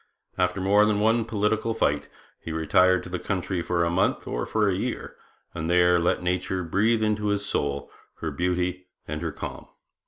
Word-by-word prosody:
After 90 +1 0
more 100 +3 +4
than 105 -1 +1
one 115 +2 +3
political 110 0 0
fight 75 -9 0 0.3
he 80 - -7
retired 90 +3 +3
to - - -9
the 90 0 -3
country 95 -1 -2
for 85 0 0
a 85 - +1
month 90 +2 +1
or - - -3
for 110 -1 +1
a 100 - +2
year, 115 +7 -4 0.4
and 80 -1 -3
there 90 0 +4
let 85 +1 +1
nature 90 +1 -1
breathe 110 +6 +2
into 105 -1 0
his 100 0 0
soul 70 -6 -2 0.2
her 80 - -4
beauty 90 +3 -1 0.2
and 75 +1 -4
her 85 -2 -2
calm. - - -7
90 Hz, 185 wpm, -26 LUFS, 85-105 Hz, 0.4 s, more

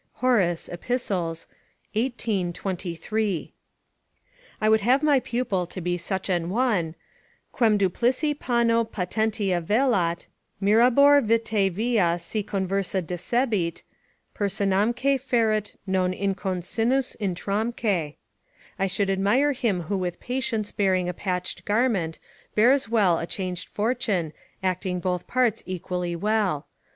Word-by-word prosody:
Horace, 200 -10 +1
Ep., 175 - -8
xvii. 200 -9 -1 1.2
23.] 190 +1 -3 1.1
I 215 - +1
would 220 0 +4
have 255 +7 +3
my 290 -3 +5
pupil 235 -8 -2
to 185 - -7
be 175 0 -1
such 185 +2 -3
an 175 -3 0
one, 200 -7 0 0.6
"Quem 220 -4 +3
duplici 245 - +1
panno 235 -4 +2
patentia 205 -2 -1
velat, 195 -4 +1 0.3
Mirabor, 250 +8 +5
vitae 220 -3 +2
via 195 -3 +1
si 210 +5 -2
conversa 195 -1 -1
decebit, 180 0 -1 0.5
Personamque 210 +7 +1
feret 225 -5 0
non 185 -1 +1
inconcinnus 200 +7 -1
utramque." 200 -3 -1 0.6
["I 195 - +2
should 195 +1 0
admire 205 +10 +2
him 225 -9 0
who 190 +4 -2
with 175 -1 -3
patience 235 -4 -2
bearing 185 -4 +1
a - - -2
patched 180 0 -3
garment, 205 -7 +1 0.4
bears 250 +4 +4
well 200 -7 +3
a 165 - -4
changed 185 -1 -4
fortune, 210 -8 -1 0.3
acting 185 0 -1
both 180 -1 -2
parts 240 -3 +1
equally 180 -1 -3
well." 195 -5 0
200 Hz, 115 wpm, -25 LUFS, 180-230 Hz, 1.2 s, my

